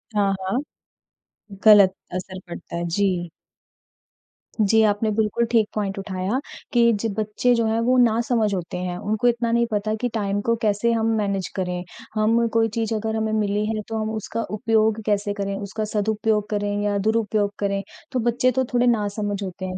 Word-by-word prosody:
हाँ, 200 -1 +3
हाँ। 190 +6 -1 1.0
गलत 205 -3 +8 0.2
असर 185 +1 -5
पड़ता 170 0 -8
है। 170 0 -2
जी। 180 -1 0 1.3
जी, 220 +2 +4
आपने 210 +1 +2
बिल्कुल 220 +2 +1
ठीक 225 -3 +4
पॉइंट 200 -2 -2
उठाया 195 +4 -2 0.3
कि 235 -1 +5
जो 225 - 0
बच्चे 215 +3 +1
जो 230 -1 +1
हैं 220 +1 +1
वो 255 0 +4
ना 230 -2 +4
समझ 220 -4 +1
होते 180 -2 -4
हैं, 180 0 -3
उनको 215 +5 0
इतना 235 -1 +1
नहीं 235 0 +3
पता 215 +1 0
कि 245 - +1
टाइम 205 -2 -1
को 230 +2 +1
कैसे 215 +1 +2
हम 225 -1 +1
मैनेज 200 -3 -1
करें। 180 -2 -2 0.3
हम 225 +2 +3
कोई 225 0 +3
चीज़ 225 -1 0
अगर 220 +1 -2
हमें 220 0 -1
मिली 210 -1 0
है 215 0 -2
तो 225 -1 -3
हम 215 - -2
उसका 220 +1 -3
उपयोग 220 0 +1
कैसे 205 -1 0
करें, 200 -1 -3
उसका 205 +2 -4
सदुपयोग 210 0 0
करें 205 -1 -1
या 205 -1 +1
दुरुपयोग 215 0 +1
करें। 200 -1 0 0.3
तो 255 - 0
बच्चे 240 +2 +2
तो 260 +2 +1
थोड़े 245 0 +3
नासमझ 205 -3 0
होते 185 0 -6
हैं 185 0 -4
210 Hz, 180 wpm, -23 LUFS, 200-225 Hz, 1.3 s, गलत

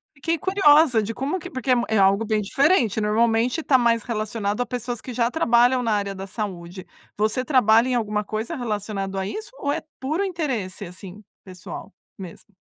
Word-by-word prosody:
Fiquei 325 +4 -1
curiosa 300 - +4
de 225 +3 -4
como 280 +10 -2
que 360 - -9
me - - -21
porque 260 0 -1 0.2
é 220 - +1
algo 200 +3 +3
bem 215 -1 0
diferente, 240 - +2
normalmente 225 +6 +1
está 265 -3 +4
mais 235 -2 +2
relacionado 215 -1 -2
a - - 0
pessoas 245 -1 -5
que 250 - -7
já 235 0 +1
trabalham 245 -3 +3
na 225 - 0
área 200 -1 -1
da 190 +1 -6
saúde. 185 -3 -6 0.3
Você 215 +4 0
trabalha 245 -2 +4
em 250 - +1
alguma 210 -2 -1
coisa 220 +10 -4
relacionado 205 -5 -4
a 190 - -3
isso, 440 - -6
ou 285 - -1
é 325 - -3 0.2
puro 310 +9 -1
interesse 260 - -3
assim 185 +3 -10 0.2
pessoal 185 +2 -10 0.2
mesmo? 190 +2 -11
230 Hz, 185 wpm, -23 LUFS, 205-260 Hz, 0.3 s, curiosa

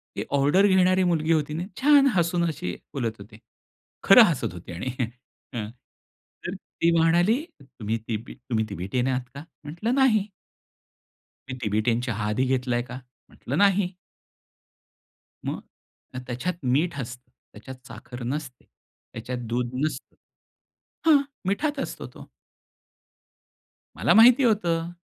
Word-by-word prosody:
ती - - -2
ऑर्डर 160 +9 +4
घेणारी 185 0 +4
मुलगी 165 -2 +1
होती 150 -1 0
ना, 165 +3 -3 0.2
छान 285 -1 +6
हसून 170 0 +1
अशी 90 - -4 0.2
बोलत 115 -6 -3
होती. 105 +2 -13 0.7
खरं - - +9
हसत - - 0
होती 90 0 -10
आणि 125 +9 -4 0.6
अ, 115 -3 -3 1.2
ती 170 - +4
म्हणाली 175 - +3 0.2
"तुम्ही 115 -4 -4
तिबी 115 0 -4
तुम्ही 115 -3 -2
तिबेटियन 100 +7 -2
आहात 130 -1 0
का?" 140 - -7 0.2
म्हटलं 175 - -2
"नाही." 225 -7 +3 1.2
"तुम्ही 130 -1 -6
तिबेटियन 110 +2 +1
चहा 105 -1 -2
आधी 130 +4 +1
घेतलाय 125 -2 0
का?" 125 +1 -7 0.3
म्हटलं 140 +6 -5
"नाही." 195 -2 +2 1.5
मग - - -3 0.7
त्याच्यात 125 +9 -2
मीठ 145 +6 +1
असतं, 125 0 -8 0.2
त्याच्यात 130 +5 -11
साखर 120 +2 -9
नसते, 130 0 -5 0.5
त्याच्यात 125 0 -5
दूध 120 0 -1 0.2
नसतं. 155 - -5 0.9
हां, 300 -3 +6 0.3
मिठात 290 +9 0
असतो - - -5
तो. - - -12 1.7
मला - - +3
माहिती 245 +4 +7
होतं. 170 -7 +1
140 Hz, 120 wpm, -25 LUFS, 120-185 Hz, 1.7 s, खरं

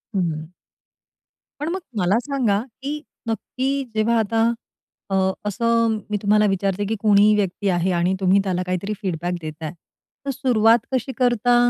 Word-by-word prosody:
हम्म. 160 -4 -1 1.1
पण 300 - -2
मग 370 +3 -2 0.2
मला 195 +3 +3
सांगा, 245 -7 0 0.2
की 295 +2 -3 0.3
नक्की 265 +4 -2
जेव्हा 225 +2 +2
आता 225 +1 +1 0.7
अ, 195 - 0 0.3
असं 230 +2 +1
मी 210 - 0
तुम्हाला 210 +1 +4
विचारते, 195 +1 0
की 220 +3 -1
कोणीही 210 0 +5
व्यक्ती 200 0 0
आहे 180 0 +1
आणि 175 +1 +1
तुम्ही 190 +1 +4
त्याला 185 -2 -1
काहीतरी 185 +3 -2
फीडबॅक 175 -2 -2
देत 155 -1 -5
आहे. 155 - -3 0.5
तर - - -2
सुरुवात 240 -3 +4
कशी 260 +1 0
करता? 245 -1 +3
210 Hz, 150 wpm, -22 LUFS, 185-235 Hz, 1.1 s, कोणीही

